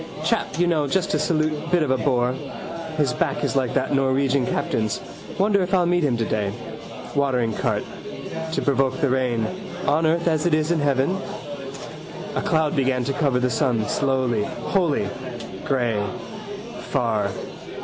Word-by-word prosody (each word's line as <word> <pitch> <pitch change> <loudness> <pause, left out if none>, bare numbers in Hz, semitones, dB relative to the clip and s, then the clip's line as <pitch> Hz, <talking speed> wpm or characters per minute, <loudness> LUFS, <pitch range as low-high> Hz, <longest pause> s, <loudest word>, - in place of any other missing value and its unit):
Chap - - 0
you 175 - +4
know 160 -4 +2
just 185 +5 +1
to 150 - +2
salute 155 0 +2 0.2
bit 175 -2 +4
of 140 - 0
a 130 - +3
bore. 125 -2 +2 0.6
His 140 -5 +2
back 155 0 0
is - - 0
like 130 -3 +1
that - - +1
Norwegian 135 -1 +2
captain's. 110 -2 0 0.4
Wonder 200 0 +3
if 185 +1 +1
I'll 180 -2 +4
meet 175 0 +2
him 130 -5 +2
today. 105 -3 0 0.6
Watering 125 -5 +2
cart. - - 0 0.7
To - - 0
provoke 135 -1 +2
the 140 -4 +2
rain. 125 -4 +1 0.4
On 155 +3 +3
earth 170 +2 +2
as 160 0 +2
it 160 - +4
is 155 +1 +1
in 170 - +2
heaven. 140 +1 +2 1.2
A - - 0
cloud 160 -2 +2
began 130 -2 +2
to 140 - -1
cover 140 -3 +2
the 125 0 +1
sun 115 -3 +1
slowly, 130 -6 +1
wholly. 165 - 0 0.6
Grey. 120 -6 +1 0.9
Far. 115 -7 +1
135 Hz, 160 wpm, -23 LUFS, 125-155 Hz, 1.2 s, you